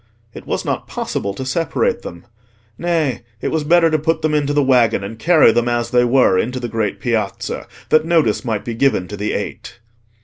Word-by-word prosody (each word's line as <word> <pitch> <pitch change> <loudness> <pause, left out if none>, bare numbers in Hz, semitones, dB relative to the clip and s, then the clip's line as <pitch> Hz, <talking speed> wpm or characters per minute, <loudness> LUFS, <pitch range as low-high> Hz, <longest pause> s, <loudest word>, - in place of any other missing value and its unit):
It - - -11
was - - -2
not - - -3
possible 100 - -3
to 130 - -5
separate 155 +4 -1
them: 85 +6 -10 0.5
nay, 155 -6 -1 0.2
it - - -2
was 160 -2 -1
better 165 +1 +4
to 155 - +2
put 160 +1 -1
them 155 -1 +1
into 145 -1 +1
the 145 0 +2
waggon 125 -6 +3
and 110 +3 -7
carry 160 -3 +5
them 120 +1 +1
as 120 -1 -1
they 125 0 +4
were 120 -7 +3
into 125 +5 -2
the 120 - -4
great 110 -3 -2
Piazza, 110 -5 -2 0.2
that 155 0 +4
notice 160 -9 +1
might 110 -4 -3
be 120 - -3
given 115 -6 +1
to 105 - -5
the 105 +1 -3
Eight. - - -6
125 Hz, 205 wpm, -18 LUFS, 115-155 Hz, 0.5 s, carry